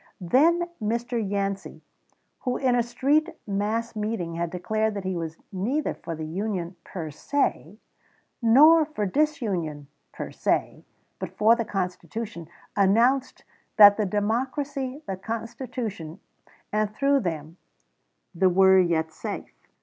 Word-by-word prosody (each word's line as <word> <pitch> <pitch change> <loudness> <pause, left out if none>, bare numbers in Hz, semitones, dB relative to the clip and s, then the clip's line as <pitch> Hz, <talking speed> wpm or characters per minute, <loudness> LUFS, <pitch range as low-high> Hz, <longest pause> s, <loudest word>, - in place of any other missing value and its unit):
Then 320 - +3
Mr. 235 +2 -1
Yancey, 195 -1 -3 0.6
who 250 -2 -2
in 260 -2 +2
a 245 - +3
street 275 +7 +1 0.2
mass 215 +3 -2
meeting 210 -6 -3
had 170 0 -2
declared 215 +5 -1
that 200 - -4
he 190 0 -2
was 165 -1 -4
neither 235 +11 -1
for 165 - -7
the 155 0 -5
Union 185 +1 -3
per 160 -5 -6
se 210 - -1 0.6
nor 300 +8 +7
for 290 -9 -3
disunion 195 - -1 0.3
per - - -6
se, - - -1 0.4
but - - -7
for 220 +2 +6
the 230 -1 -2
Constitution, 185 -1 -4 0.3
announced 235 +7 +2 0.3
that 205 -1 +10
the 210 -2 0
Democracy, 260 +7 -2
the 190 - -4
Constitution, 225 - -5 0.5
and, 215 -1 +1
through 280 +2 +3
them, 165 - -4 0.8
the 185 +2 +3
were 190 +1 +6
yet 160 -3 +1
safe. - - -6
210 Hz, 125 wpm, -25 LUFS, 185-245 Hz, 0.8 s, that